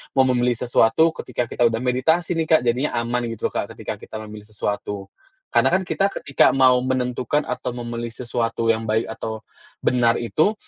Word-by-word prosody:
mau 135 - +6
memilih 125 -1 +2
sesuatu, 120 +6 +4
ketika 125 - -2
kita 120 - +3
udah 115 0 -2
meditasi 160 +8 +1
nih 160 - 0
Kak, - - +3
jadinya 125 +4 0
aman 120 +1 -1
gitu 115 -2 -3
loh - - -26
Kak, - - -3
ketika - - -6
kita - - -11
memilih 105 -1 -10
sesuatu. 105 -1 -4 0.4
Karena - - +3
kan 190 - +2
kita 195 +2 +1
ketika 140 -2 +3
mau 130 -1 +5
menentukan 130 +2 0
atau 125 - -4
memilih 120 -1 -5
sesuatu 115 -2 -2
yang 110 0 -2
baik 110 +1 0
atau 110 -1 -5 0.4
benar 120 -2 +3
itu 155 - +1
120 Hz, 180 wpm, -22 LUFS, 115-130 Hz, 0.4 s, mau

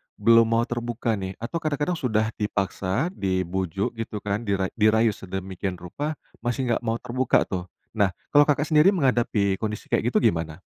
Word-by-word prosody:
belum 115 +2 +5
mau 115 +1 +2
terbuka 120 -1 -2
nih, 95 0 -5
atau 140 +9 -4
kadang-kadang 155 +3 -1
sudah 110 -3 +1
dipaksa, 100 - -1
dibujuk 95 - -1
gitu 110 -1 -4
kan, 105 +2 -2
dira 95 -1 0
dirayu 110 +1 +4
sedemikian 95 -1 -5
rupa, 145 - -5 0.2
masih 120 0 -1
nggak 115 - +1
mau 115 0 0
terbuka 130 +2 +1
tuh. 90 -1 -4 0.3
Nah, 100 -3 +3 0.2
kalau, 145 0 +7
Kakak, 145 0 +2
sendiri 155 +4 +6
menghadapi 115 - +1
kondisi 105 -1 -4
kayak - - +2
gitu, - - +2
gimana? 80 -2 0
110 Hz, 160 wpm, -25 LUFS, 95-120 Hz, 0.3 s, kalau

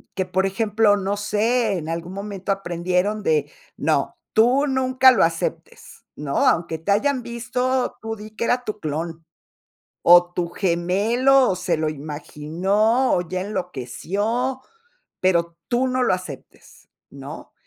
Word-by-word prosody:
que 190 - -1
por 190 +1 0
ejemplo, 210 +1 +2
no 200 +1 -2
sé, 215 +1 +1
en 155 - -7
algún 170 +2 -4
momento 200 -1 -4
aprendieron 185 +2 -1
de, 150 -3 +1 0.3
no, - - 0 0.2
tú 250 +6 +4
nunca 260 0 +4
lo 250 - +3
aceptes, 165 0 -4
¿no?, 145 -2 -1
aunque 165 -1 +1
te 165 +6 -2
hayan 255 +5 +1
visto, 250 +2 -2
tú 225 0 -4
di 215 0 -11
que 235 - -3
era 250 +1 +1
tu 215 -2 -5
clon, 160 +1 -4 0.8
o 175 0 +6
tu 175 -1 -2
gemelo, 210 +10 +2
o 185 - -1
se 180 - -1
lo 155 0 0
imaginó, 165 - 0
o 175 - +1
ya 185 +1 -2
enloqueció, 205 - -3 0.6
pero 170 -2 +1
tú 255 +2 +1
no 255 0 0
lo - - +2
aceptes, 180 -7 -11 0.2
¿no? 140 +3 -10
195 Hz, 145 wpm, -22 LUFS, 170-230 Hz, 0.8 s, o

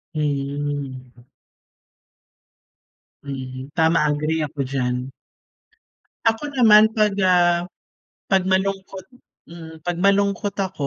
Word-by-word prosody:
Mhm. 140 -4 -4 2.0
Mhm, 130 -1 -7
tama 160 0 +3
agree 155 +2 -1
ako 150 0 -7
diyan. 125 -1 -2 1.2
Ako 225 +6 +1
naman 220 -3 +7
'pag, 215 -2 +1
ah, 175 -1 +3 0.6
'pag 190 -1 +3
malungkot 190 0 -1 0.5
mm 160 -2 -11
'pag 175 -1 -2
malungkot 200 +1 +1
ako, 190 -7 -3
165 Hz, 90 wpm, -21 LUFS, 140-195 Hz, 2.0 s, naman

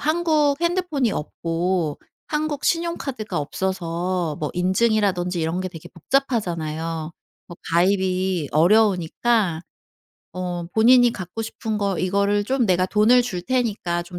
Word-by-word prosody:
한국 310 -2 +2
핸드폰이 340 - 0
없고 165 0 -2 0.3
한국 300 -2 -2
신용카드가 275 - -2
없어서 175 0 -2
뭐 150 - -2
인증이라든지 185 -2 +1
이런 165 +3 -1
게 185 - -3
되게 165 -3 -11
복잡하잖아요. 165 - -2 0.4
뭐 175 - -11 0.2
가입이 185 -2 +1
어려우니까 190 +1 +2 0.7
어 180 -1 -4
본인이 240 +2 +5
갖고 185 +4 -6
싶은 220 0 -4
거 200 -3 -1
이거를 200 +2 +1
좀 255 +1 +1
"내가 185 -1 +2
돈을 215 +5 +4
줄 185 -8 -4
테니까 210 -9 -1
좀 175 0 -8
190 Hz, 285 characters per minute, -22 LUFS, 175-240 Hz, 0.7 s, 본인이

